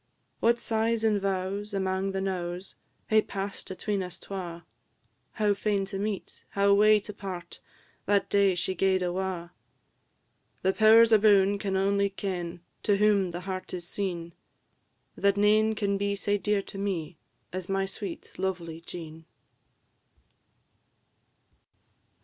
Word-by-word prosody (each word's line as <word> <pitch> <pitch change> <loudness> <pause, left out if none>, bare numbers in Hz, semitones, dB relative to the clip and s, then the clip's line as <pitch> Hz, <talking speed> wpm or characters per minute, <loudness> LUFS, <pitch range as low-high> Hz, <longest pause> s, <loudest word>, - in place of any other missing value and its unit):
What 235 +1 +3
sighs 225 0 0
and 210 -2 +2
vows, 195 +2 -2
amang 190 0 0
the 195 0 -2
knowes, 180 -1 -3 0.4
Hae 215 0 +5
pass'd 200 -1 -5
atween 195 +1 -2
us 180 -1 -6
twa! 175 -3 -7 0.7
How 210 -2 +2
fain 200 -1 0
to 195 0 -5
meet, 205 -1 -4
how 200 0 +3
wae 215 +1 +6
to 210 +1 -8
part, 185 -4 -7 0.5
That 200 0 +3
day 200 -2 +3
she 180 +2 -1
gaed 190 0 +2
awa'! 180 -1 -3 1.1
The 190 +1 +3
Powers 225 +2 +7
aboon 205 -2 +5
can 195 -2 -1
only 200 +1 +2
ken, 180 -4 -4 0.2
To 205 -1 +2
whom 205 -2 +3
the 175 +1 -5
heart 185 0 -5
is 175 -1 -6
seen, 175 -4 -3 0.8
That 200 0 +2
nane 215 +2 +4
can 200 -2 0
be 200 0 0
sae 205 +1 0
dear 205 0 +1
to 195 - -9
me 175 -5 -3 0.3
As 185 0 -4
my 195 0 +1
sweet, 195 -2 -7
lovely 175 -4 -3
Jean. 160 -2 -9
195 Hz, 135 wpm, -28 LUFS, 185-205 Hz, 1.1 s, Powers